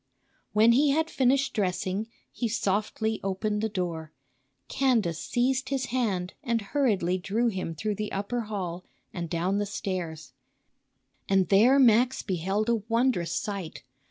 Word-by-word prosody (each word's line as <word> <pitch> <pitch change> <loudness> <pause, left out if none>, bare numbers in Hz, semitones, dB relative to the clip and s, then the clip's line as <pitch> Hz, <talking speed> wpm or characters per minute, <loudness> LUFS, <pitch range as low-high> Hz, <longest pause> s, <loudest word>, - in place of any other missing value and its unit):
When 220 +2 +6
he 280 +5 +4
had 320 +3 +1
finished 270 +1 +2
dressing 190 +1 -1 0.2
he 240 - -2
softly 215 +1 -1
opened 210 +2 -1
the 220 - 0
door. 170 -5 -4 0.6
Candace 220 - +1
seized 260 +2 0
his 270 -2 -1
hand 195 -8 -1
and 235 -4 0
hurriedly 195 -11 +1
drew 220 +6 0
him 185 -5 -4
through 210 +6 -2
the 210 +1 -4
upper 205 +5 -2
hall 185 -4 -4 0.3
and 170 -2 -4
down 180 +5 0
the 205 - -1
stairs. 175 -6 -5 1.0
And 190 -3 +3
there 230 +8 +6
Max 250 0 +4
beheld 195 +4 -1
a 235 0 +3
wondrous 230 -8 +1
sight. 195 -6 -4
210 Hz, 140 wpm, -27 LUFS, 185-240 Hz, 1.0 s, When